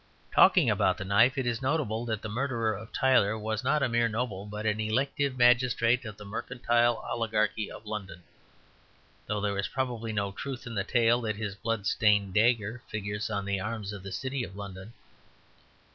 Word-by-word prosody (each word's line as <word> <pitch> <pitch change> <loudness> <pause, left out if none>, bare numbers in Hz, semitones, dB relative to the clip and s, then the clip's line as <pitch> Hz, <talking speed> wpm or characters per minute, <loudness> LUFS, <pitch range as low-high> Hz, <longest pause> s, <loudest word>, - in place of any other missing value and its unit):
Talking - - +6
about - - +2
the 100 - -5
knife, 110 +7 +4
it 130 - 0
is 120 0 -1
notable 130 -5 -1
that 110 -3 -3
the - - -3
murderer 115 -1 -1
of 110 +3 -9
Tyler 120 -5 +3
was 110 +2 -3
not 140 +2 +2
a - - +3
mere 120 -1 +2
noble 110 -3 -3
but 105 +1 -6
an 105 0 +1
elective 135 +5 0
magistrate 120 0 +3
of 105 -2 -7
the 105 - -10
mercantile 120 +2 +1
oligarchy 110 -2 0
of - - -11
London; 100 -4 -6 1.0
though 105 0 -1
there 100 -1 -1
is 100 - -1
probably 120 -4 -3
no 100 -2 -1
truth 130 +5 -6
in 115 - -6
the 100 -3 -1
tale 120 +3 +3
that 110 -2 -2
his 105 -1 -4
blood 110 0 -3
stained 100 0 +2
dagger 115 +2 +2
figures 105 +1 -4
on 100 -3 -2
the 100 -1 -1
arms 105 0 -4
of 100 - -7
the 95 +1 -8
City 130 +5 -3
of 95 - -8
London. 100 0 -8
110 Hz, 190 wpm, -29 LUFS, 105-120 Hz, 1.0 s, Talking